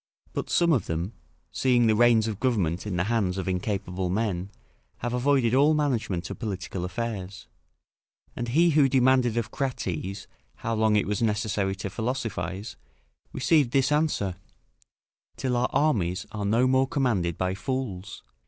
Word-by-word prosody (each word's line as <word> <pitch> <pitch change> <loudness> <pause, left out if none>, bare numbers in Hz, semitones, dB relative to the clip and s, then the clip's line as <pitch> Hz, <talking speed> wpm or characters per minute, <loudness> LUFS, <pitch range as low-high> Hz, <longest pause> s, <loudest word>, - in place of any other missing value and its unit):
But - - -3
some 170 -1 +3
of 125 - 0
them, 85 +6 -3 0.4
seeing 125 -2 +3
the 110 - +4
reins 115 -1 +4
of 105 -2 -4
government 100 -8 0
in 100 - -2
the 90 - +2
hands 100 -3 0
of 95 - -3
incapable 95 -1 -2
men, 95 -2 -1 0.5
have 120 0 -3
avoided 125 -2 +2
all 145 +4 +5
management 110 - -1
of - - -7
political 95 -4 -4
affairs; 95 0 -4 0.9
and 120 - -3
he 165 +8 +4
who 145 -3 +4
demanded 130 -2 +3
of 115 - -2
Crates, 100 - -3 0.3
how 115 - -3
long 110 -1 +2
it 105 - +2
was 105 +3 -2
necessary 105 -3 0
to 100 0 -5
philosophise, 110 -3 -3 0.5
received 145 -7 +2
this 135 0 +3
answer: 150 - 0 1.0
"Till 130 -2 -1
our 120 +1 +1
armies 100 - +1
are 105 -2 -4
no 115 +5 +3
more 130 +1 +3
commanded 115 - 0
by 95 0 0
fools." 100 -4 -4
110 Hz, 155 wpm, -26 LUFS, 95-130 Hz, 1.0 s, all